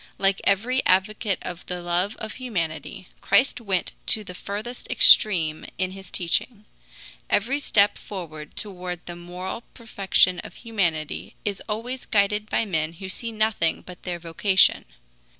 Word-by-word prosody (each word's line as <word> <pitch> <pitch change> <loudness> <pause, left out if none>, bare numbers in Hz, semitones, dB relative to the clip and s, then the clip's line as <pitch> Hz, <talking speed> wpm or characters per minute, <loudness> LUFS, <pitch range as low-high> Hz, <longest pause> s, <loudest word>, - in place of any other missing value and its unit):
Like 195 0 +2
every 235 +7 +2
advocate 200 +1 +2
of 175 -1 -6
the 180 0 -3
love 175 +4 0
of 220 -1 -6
humanity, 180 - -4
Christ 245 +5 +3
went 195 -5 0 0.2
to 220 -2 +3
the 185 - -9
furthest 210 +7 -6
extreme 165 -7 +5
in 185 0 -1
his 190 -1 -10
teaching. 210 +5 -1 0.6
Every 255 +8 +1
step 205 -7 +3
forward 160 -6 -8
toward 180 -3 -5
the 175 - -7
moral 180 +5 -6
perfection 195 -5 +2
of - - -9
humanity 175 -10 -2
is 205 -2 -2
always 240 +5 -4
guided 210 0 +2
by - - +1
men 160 -5 -1
who 190 +3 -8
see 230 +4 -4
nothing 215 -6 +1
but 180 -1 -11
their 180 -1 -3
vocation. 175 +3 +3
195 Hz, 145 wpm, -25 LUFS, 175-215 Hz, 0.6 s, extreme